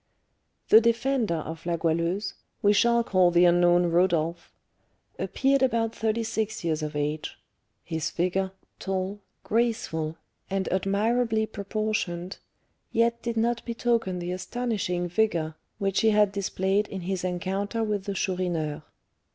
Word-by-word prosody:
The 220 - +9
defender 235 -3 +1
of 160 +1 -6
La 170 -1 +1
Goualeuse 170 +4 0 0.3
(we 205 0 +5
shall 235 +3 +4
call 185 -5 +4
the 175 0 +5
unknown 175 0 +5
Rodolph) 170 -1 +1 0.7
appeared 275 0 +1
about 230 -3 +1
thirty 225 +1 -1
six 220 -2 -2
years 160 -2 0
of 150 0 -4
age; 150 +1 -2 0.5
his 160 -2 -2
figure, 185 +2 0 0.3
tall, 190 +1 -2 0.2
graceful, 205 -9 -1 0.3
and 195 -1 -1
admirably 220 +4 +1
proportioned, 200 -4 -3 0.5
yet 235 +1 +2
did 235 -1 -3
not 235 +1 +1
betoken 230 -5 0
the 175 0 -4
astonishing 185 -3 -2
vigour 170 -4 0 0.2
which 195 -2 0
he 225 - +4
had 210 -2 +4
displayed 200 +1 0
in 190 -2 -6
his 185 +1 -3
rencounter 195 +5 -2
with 205 -3 -2
the 200 - -3
Chourineur. 175 -6 -1
195 Hz, 130 wpm, -27 LUFS, 175-225 Hz, 0.7 s, The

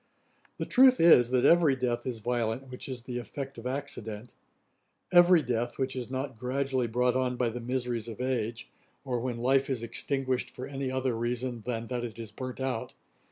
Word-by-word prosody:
The - - -2
truth 255 0 +6
is, 145 -8 +7
that 125 -1 +2
every 165 -5 +5
death 120 -2 -2
is 120 -3 -3
violent 120 +2 -1
which 125 - -7
is 125 -2 -5
the 125 -1 -4
effect 135 +1 -7
of 120 - -5
accident; 120 -5 -5 0.8
every 175 -2 +7
death, 120 -1 -2
which 130 0 -1
is 125 -2 -4
not 130 -2 -4
gradually 130 0 0
brought 125 +2 +1
on 130 -1 +1
by 120 -2 +1
the 120 +2 -6
miseries 120 -2 -2
of 115 0 -8
age, 120 -3 -2 0.4
or 125 -3 -1
when 120 0 -3
life 135 +3 +2
is 125 -4 -2
extinguished 130 +2 -2
for 130 - -7
any 135 -1 -4
other 130 -2 -1
reason 120 +1 -2
than 115 -2 -2
that 125 -1 -2
it 115 -2 -6
is 115 -3 -7
burnt 130 +3 -6
out. 130 -3 -3
125 Hz, 190 wpm, -29 LUFS, 120-130 Hz, 0.8 s, is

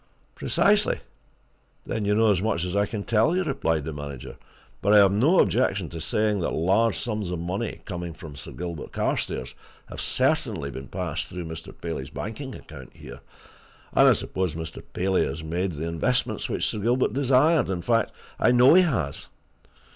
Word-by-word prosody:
"Precisely! - - +2 0.9
then 110 - -2
you 105 0 +2
know 110 0 +4
as 95 -3 +1
much 100 -5 0
as 90 +1 -3
I 100 0 +2
can 105 -2 -4
tell 115 - +2
you," 185 - +1
replied 130 - 0
the 80 - -4
manager. 70 -3 -7 0.5
"But 100 +2 +3
I - - +9
have 100 -2 +7
no 135 - +4
objection 100 -8 +2
to 85 -1 -7
saying 105 +6 +1
that 85 - -1
large 100 +7 +2
sums 105 -5 -3
of 90 - -2
money, 90 +7 -4
coming 85 -3 -5
from 80 -4 -10
Sir - - -8
Gilbert 85 -3 -6
Carstairs, - - -2 0.4
have - - -6
certainly 70 0 0
been 65 0 -8
passed - - -3
through 90 -2 -6
Mr. 80 0 -7
Paley's 75 -5 -4
banking 125 - -6
account - - -12
here, - - -11 0.7
and - - +6
I - - +7
suppose 95 -4 -2
Mr. 80 -1 -6
Paley 95 +1 +1
has 70 +4 -4
made 90 +3 -2
the 80 +2 -4
investments 85 +10 -1
which - - -1
Sir 110 - -2
Gilbert 120 +2 +1
desired 140 - +3
in 90 -3 -2
fact, 115 -1 +2 0.3
I - - +4
know 125 +3 +7
he 185 - +8
has. 105 - -1
95 Hz, 180 wpm, -25 LUFS, 80-115 Hz, 0.9 s, I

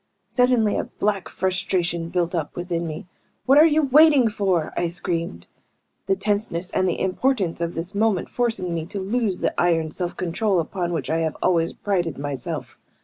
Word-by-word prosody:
Suddenly 250 -4 +2
a - - -1
black 200 -2 -2
frustration 175 -2 -1
built 175 0 -1
up 160 -4 -3
within 175 -1 -3
me. 155 +2 -6 0.4
"What 275 +3 +6
are 315 - +8
you 310 0 +2
waiting 285 -3 +6
for?" 190 -6 0
I 175 - 0
screamed, 165 - -4 0.6
the 195 - +3
tenseness, 195 -3 -2
and 185 0 +1
the - - -2
importance 190 -2 0
of 170 0 -2
this 170 +4 -5
moment 205 -2 +1
forcing 225 -8 -1
me 165 -1 -3
to 200 - -5
lose 200 -1 -1
the - - +1
iron 165 -3 +2
self 175 +1 -4
control 185 +2 0
upon 175 +1 -2
which 155 -4 -2
I 165 - +1
have 160 -2 -1
always 165 -2 +2
prided 175 -6 -1
myself. 140 -2 -5
180 Hz, 175 wpm, -23 LUFS, 170-210 Hz, 0.6 s, are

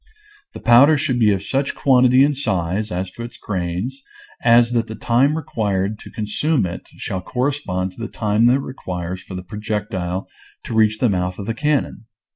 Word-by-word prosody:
The - - -8
powder 135 +6 +6
should 130 -4 0
be 110 -3 +5
of 95 -1 -1
such 135 +5 -1
quantity 130 -1 +5
and 145 0 +2
size, 95 -4 -1
as 90 +1 -3
to 120 - -10
its 120 +1 -8
grains, 95 +8 -3 0.4
as 120 0 +5
that 115 -2 0
the 110 - -6
time 130 +8 +2
required 105 -7 -2
to - - -11
consume 115 +5 0
it 85 -1 -6
shall 95 - -4
correspond 125 -7 -2
to 90 - -17
the 115 - -3
time 110 +1 +1
that 125 - +5
it 140 - 0
requires 90 -8 -5
for 95 - -9
the 90 - -6
projectile 100 -2 -3 0.4
to - - -6
reach 110 -1 +3
the 125 - +2
mouth 90 -3 -1
of 100 - -6
the 115 - -2
cannon. 150 -2 -1
110 Hz, 190 wpm, -20 LUFS, 95-125 Hz, 0.4 s, powder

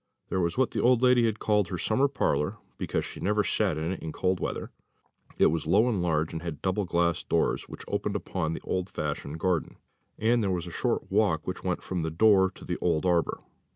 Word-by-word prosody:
There 95 - 0
was 85 +4 -1
what 130 -1 +2
the - - -1
old 125 0 +4
lady 125 -2 +5
had 110 -1 -1
called 105 -3 +1
her 90 - -4
summer 120 +10 +2
parlour, 125 - 0 0.2
because - - -1
she - - -8
never 105 +1 +1
sat 100 -8 +1
in 80 +3 -2
it 95 - -4
in 80 - -5
cold 90 +1 0
weather; - - -4 0.7
it - - +5
was 80 -1 -2
low 115 - +4
and 105 -7 0
large, 80 -2 0
and 80 - -4
had 80 -4 -5
double 95 +2 0
glass 85 -1 +1
doors, 85 - 0
which - - -9
opened - - -2
upon 80 0 -2
the - - -6
old 95 +1 -2
fashioned 75 -3 -4
garden; 90 -2 -1 0.4
and 115 +2 +2
there 100 - 0
was 90 -2 -1
a 85 - -7
short - - -1
walk 80 -8 +2
which 90 - -5
went 90 -1 -2
from 90 -2 -3
the 80 - -1
door 95 +3 +4
to 95 - -13
the 90 - -2
old 85 -1 0
arbour. 85 -2 +1
90 Hz, 225 wpm, -28 LUFS, 85-105 Hz, 0.7 s, lady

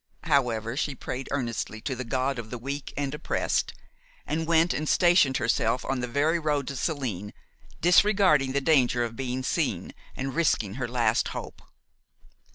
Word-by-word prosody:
However, 120 -7 +1
she 145 0 -1
prayed 130 +1 -5
earnestly 115 -5 -3
to 135 +1 -3
the 130 - -4
God 130 +2 -1
of 110 -2 -7
the 125 - -5
weak 140 +4 -5
and 140 -1 -2
oppressed, 150 - -1 0.5
and 160 +1 -2
went 165 +1 +3
and 155 0 -2
stationed 175 -7 +4
herself 120 0 0
on 135 - -1
the 125 - -2
very 150 +7 +1
road 150 -3 -1
to 140 - -5
Saline, 120 - -3 0.5
disregarding 180 -6 +4
the 140 - +1
danger 130 -5 +3
of 115 -1 -4
being 130 0 -3
seen, - - -1 0.2
and 135 0 -4
risking 120 - +1
her 120 - -1
last 120 -2 +1
hope. - - -8
135 Hz, 165 wpm, -27 LUFS, 120-150 Hz, 0.5 s, stationed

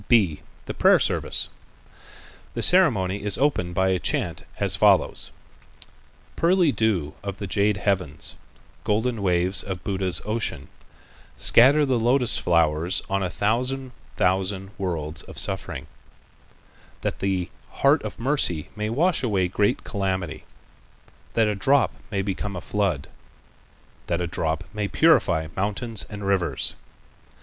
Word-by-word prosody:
(b) 100 -11 +3 0.2
The - - -5
Prayer - - +5
Service.—The - - -5
ceremonial 105 - +3
is 105 -2 0
opened 90 -12 0
by 95 +1 +2
a 95 -1 +1
chant - - -2
as - - 0
follows: - - +3 1.1
"Pearly 175 -2 +3
dew 100 - 0
of 100 -1 -5
the 100 - -5
jade 100 +1 +1
heavens, 95 -8 -1 0.5
golden 110 +1 0
waves 90 0 +3
of 95 -4 -6
Buddha's 95 -2 0
ocean, 105 -10 -2 0.7
scatter 140 +5 +5
the 130 -3 +1
lotus 120 +1 +2
flowers 85 0 +1
on 100 0 +1
a 90 - -1
thousand 125 +7 -1 0.3
thousand 95 +1 0
worlds 80 -5 -3
of - - -13
suffering, - - -2 1.2
that - - -3
the 95 -2 -1 0.2
heart 140 +2 +3
of 105 - -7
mercy 115 - 0
may 105 0 -2
wash 165 +10 +2
away 100 -7 +1
great 100 +3 0
calamity, 95 -4 -3 0.9
that 115 -2 +3
a 105 - +1
drop 135 +7 +2 0.2
may 100 -3 -1
become 100 0 -3
a - - -3
flood, 95 -9 -1 1.0
that 85 - 0
a 90 - -1
drop 80 -1 -2
may 105 -1 -2
purify 100 - +3
mountains 105 +2 -2
and 105 -2 -7
rivers. 95 -3 0
100 Hz, 130 wpm, -24 LUFS, 90-115 Hz, 1.2 s, Prayer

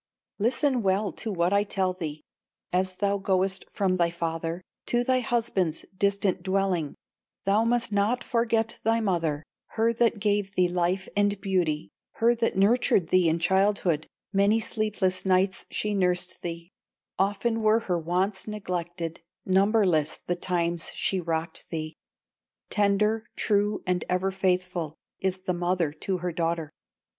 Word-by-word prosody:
"Listen 250 +4 +2
well 195 0 +1
to 220 +6 -4
what 175 0 +1
I 200 0 +4
tell 190 -2 0
thee: 155 -4 -6 0.5
As 185 +1 +1
thou 200 +1 0
goest 190 0 0
from 185 -2 0
thy 170 -1 +3
father 165 0 -3 0.2
To 240 0 +2
thy 255 0 +2
husband's 220 -9 -1
distant 200 -1 +1
dwelling, 185 -5 0 0.5
Thou 205 +3 +3
must 235 -1 +1
not 205 +5 +1
forget 230 -2 0
thy 225 +1 +3
mother, 165 -8 0 0.3
Her 225 +1 +3
that 230 -2 +2
gave 205 -1 0
thee 180 -1 +4
life 180 +2 0
and 205 -1 +2
beauty, 175 -6 -1 0.2
Her 230 +1 +3
that 230 -4 -1
nurtured 200 -3 +3
thee 180 -2 +4
in 160 - +1
childhood, 190 -2 +2 0.3
Many 200 +3 +4
sleepless 210 -4 0
nights 190 0 +1
she 210 0 -1
nursed 180 -2 0
thee; 170 +1 -5 0.5
Often 205 +4 +1
were 215 +1 +4
her 180 -5 -1
wants 185 +6 -1
neglected, 175 -5 -4 0.2
Numberless 190 -5 +3
the 175 - 0
times 170 -1 -1
she 190 - 0
rocked 165 0 -3
thee; 155 -1 -4 0.8
Tender, 210 +1 +2
true, 205 0 +1
and 180 -1 0
ever 185 +1 +1
faithful, 180 -4 -1 0.2
Is 190 -1 -1
the 180 - +1
mother 175 -3 0
to 185 +4 -2
her 180 0 -3
daughter. 165 -2 -1
190 Hz, 145 wpm, -27 LUFS, 175-210 Hz, 0.8 s, I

